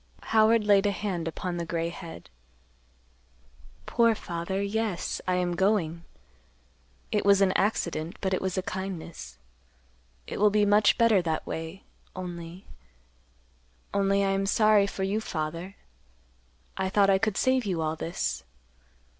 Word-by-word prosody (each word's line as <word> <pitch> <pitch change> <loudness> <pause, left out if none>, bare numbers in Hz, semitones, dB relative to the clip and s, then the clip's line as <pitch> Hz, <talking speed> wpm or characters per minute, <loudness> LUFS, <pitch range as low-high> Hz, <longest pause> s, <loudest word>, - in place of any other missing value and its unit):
Howard 220 0 +5
laid 205 -1 +4
a - - +2
hand 190 -5 -3
upon 175 +2 -4
the 170 - -2
gray 165 0 -2
head. 170 -1 -10 1.5
"Poor 230 -1 +3
father; 175 0 -4
yes, 200 -2 -2
I 185 - +2
am 180 -1 0
going. 170 -4 0 1.1
It - - +1
was 200 -1 +5
an 195 -1 +4
accident, 170 -5 -1
but 190 -1 -1
it 185 - 0
was 190 -1 -2
a 185 - 0
kindness. 190 -3 -6 0.9
It - - -6
will 210 +1 +5
be 210 0 +3
much 205 +1 +4
better 230 -5 +4
that 160 -2 -2
way—only—only 175 +1 -8 1.6
I - - +1
am 195 0 0
sorry 215 -1 +4
for 195 - -4
you, 200 +3 0
father. 170 +1 -4 1.0
I 190 - -1
thought 195 0 +4
I 190 - +3
could 215 -1 0
save 260 -2 +2
you 180 -4 -1
all 155 0 -1
this. 165 +2 -3
190 Hz, 140 wpm, -27 LUFS, 170-205 Hz, 1.6 s, Howard